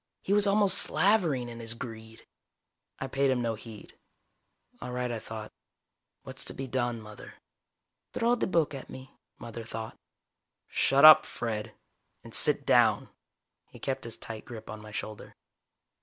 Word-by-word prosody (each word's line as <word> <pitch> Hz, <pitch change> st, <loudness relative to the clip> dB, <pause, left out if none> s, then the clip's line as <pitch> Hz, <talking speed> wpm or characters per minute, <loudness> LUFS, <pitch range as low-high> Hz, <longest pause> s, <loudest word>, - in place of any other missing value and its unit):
He 195 Hz, -, 0 dB
was 205 Hz, 0 st, +5 dB
almost 200 Hz, -1 st, +4 dB
slavering 175 Hz, -, +2 dB
in 120 Hz, -1 st, -8 dB
his 115 Hz, 0 st, -4 dB
greed. 115 Hz, -2 st, -9 dB, 0.7 s
I -, -, -4 dB
paid 135 Hz, +1 st, +1 dB
him 130 Hz, -1 st, +1 dB
no 115 Hz, -1 st, 0 dB
heed. 110 Hz, -1 st, -12 dB, 0.8 s
All 125 Hz, -, -6 dB
right, 125 Hz, 0 st, -2 dB
I 115 Hz, -, -3 dB
thought. 110 Hz, -1 st, -8 dB, 0.7 s
What's -, -, -8 dB
to -, -, -5 dB
be 135 Hz, -, -5 dB
done, 120 Hz, -2 st, -2 dB
Mother? 105 Hz, -1 st, -12 dB, 0.8 s
Throw 235 Hz, +1 st, +2 dB
the 245 Hz, -, 0 dB
book 165 Hz, -5 st, +1 dB
at 135 Hz, -, -8 dB
me, 130 Hz, 0 st, -10 dB, 0.3 s
Mother 115 Hz, 0 st, -8 dB
thought. 110 Hz, 0 st, -7 dB, 0.7 s
"Shut 140 Hz, +2 st, +4 dB
up, 155 Hz, 0 st, +11 dB
Fred. 110 Hz, -2 st, -4 dB, 0.5 s
And -, -, -13 dB
sit -, -, +3 dB
down." -, -, +3 dB, 0.6 s
He -, -, -14 dB
kept 135 Hz, -, -3 dB
his 115 Hz, -, -6 dB
tight 110 Hz, -1 st, -7 dB
grip 110 Hz, -3 st, -9 dB
on 110 Hz, 0 st, -8 dB
my 110 Hz, -, -11 dB
shoulder. 110 Hz, 0 st, -7 dB
120 Hz, 155 wpm, -29 LUFS, 110-140 Hz, 0.8 s, up